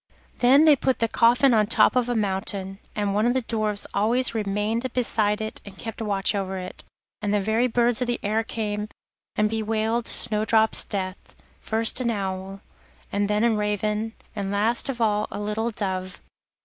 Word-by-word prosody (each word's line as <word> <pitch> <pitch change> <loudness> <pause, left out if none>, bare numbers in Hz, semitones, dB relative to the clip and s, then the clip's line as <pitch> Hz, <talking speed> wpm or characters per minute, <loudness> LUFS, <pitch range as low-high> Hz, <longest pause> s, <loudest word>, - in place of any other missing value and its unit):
Then 270 +5 +6
they 305 -2 +7
put 260 -1 0
the 230 - +1
coffin 245 +4 +4
on 215 -2 +4
the - - -16
top - - +4
of 250 -1 +2
the 245 - -1
mountain, 195 -1 -2 0.2
and 205 -1 -1
one 210 +3 +2
of 245 - +1
the 260 - 0
Dwarfs 215 -2 -1
always 235 +5 +2
remained 215 +3 -1
beside 215 -3 +1
it 220 0 -5
and 195 -2 -12
kept 225 0 -7
watch 200 -2 +1
over 190 -1 -3
it. 185 0 -7 0.4
And 205 -1 -1
the 210 - +2
very 220 +5 +1
birds 240 0 +1
of 250 - 0
the 240 0 -1
air 215 +2 +1
came 210 -2 -3 0.5
and 210 - +2
bewailed 220 +1 -1
Snowdrop's 220 0 +2
death, 185 -2 -5 0.2
first 225 +3 +1
an 240 - 0
owl, 195 -2 -4 0.5
and 200 0 0
then 210 +1 +1
a 235 -1 +3
raven, 210 +1 -1 0.2
and 200 -2 -3
last 220 +6 +1
of 245 -3 -3
all 210 -1 +1
a - - -6
little 210 +2 -2
dove. 190 -4 -4
215 Hz, 185 wpm, -24 LUFS, 205-230 Hz, 0.5 s, they